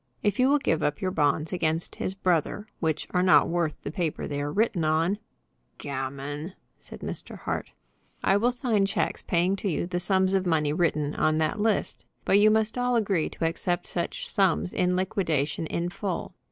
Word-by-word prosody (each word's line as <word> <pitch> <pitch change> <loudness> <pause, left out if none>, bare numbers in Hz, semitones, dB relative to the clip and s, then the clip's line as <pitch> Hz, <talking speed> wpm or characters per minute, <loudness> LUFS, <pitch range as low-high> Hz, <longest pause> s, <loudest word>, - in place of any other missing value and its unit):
"If 205 +1 +1
you 255 +1 +5
will 290 - +5
give 165 - 0
up 145 0 0
your 185 -1 -1
bonds 150 0 +1
against 165 -1 -1
his 190 - -3
brother, 185 +2 0
which 160 -2 -1
are 180 - +2
not 185 0 +5
worth 170 -3 -1
the 145 - -4
paper 165 -2 -2
they 145 -1 -3
are 145 0 -2
written 205 -2 +1
on 165 +6 +1 0.3
" - - -45
"Gammon!" 140 +4 -5 0.3
said - - -11
Mr. - - -6
Hart. - - -3 0.5
"I - - +4
will 235 +4 +3
sign 235 -5 +1
checks - - -1
paying 180 +2 +1
to 200 - -2
you 165 - -1
the 175 0 -2
sums 190 +1 +2
of 190 -1 +1
money 150 -3 +2
written 155 -3 +1
on 155 0 +2
that 155 +5 0
list. 220 -1 0 0.2
But 200 - +5
you 215 +1 +6
must 220 +2 +1
all 245 0 +1
agree 195 -8 +1
to 165 - -3
accept 175 +2 -1
such - - -3
sums 80 +4 +1
in 180 0 +1
liquidation 165 -6 0
in 170 +2 -2
full. 190 -1 -4
175 Hz, 195 wpm, -27 LUFS, 155-195 Hz, 0.5 s, you